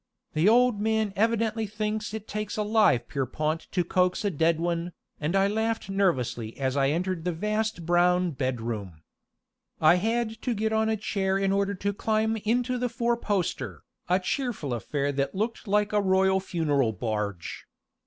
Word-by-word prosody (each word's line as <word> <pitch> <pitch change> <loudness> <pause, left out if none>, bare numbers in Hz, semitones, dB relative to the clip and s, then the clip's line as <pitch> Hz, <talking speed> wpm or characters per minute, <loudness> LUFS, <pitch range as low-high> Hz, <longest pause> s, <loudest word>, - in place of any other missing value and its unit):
"The 160 +6 +4
old 245 -1 +4
man 220 -2 +1
evidently 225 0 +1
thinks 215 +1 -3
it 220 -1 -6
takes 210 0 -4
a 210 - +1
live 210 - +3
Pierrepont 150 +4 -2
to 180 - +1
coax 180 +3 +1
a 200 - +2
dead 160 0 +2
one," 170 0 -2 0.3
and 155 +5 -1
I 195 0 +4
laughed 220 -1 -1
nervously 125 - 0
as 130 -1 0
I 135 -1 +3
entered 175 +2 -1
the 180 - 0
vast 210 +1 -2
brown 175 +1 +3
bedroom. 115 - -4 0.8
I 160 +3 +6
had 225 +2 -1
to 245 -3 -1
get 220 +1 0
on 220 0 +2
a 220 - +1
chair 195 -2 0
in 195 0 +1
order 200 0 +1
to 200 +2 -2
climb 220 +2 0
into 245 +4 0
the 250 0 0
four 235 0 0
poster, 205 -6 -2 0.3
a 180 +1 +4
cheerful 195 - -2
affair 140 +4 -1
that 140 +5 -2
looked 225 +3 -2
like 210 +1 +1
a 210 - +3
royal 190 0 +3
funeral 150 -10 0
barge. 105 -3 -4
195 Hz, 170 wpm, -27 LUFS, 155-220 Hz, 0.8 s, I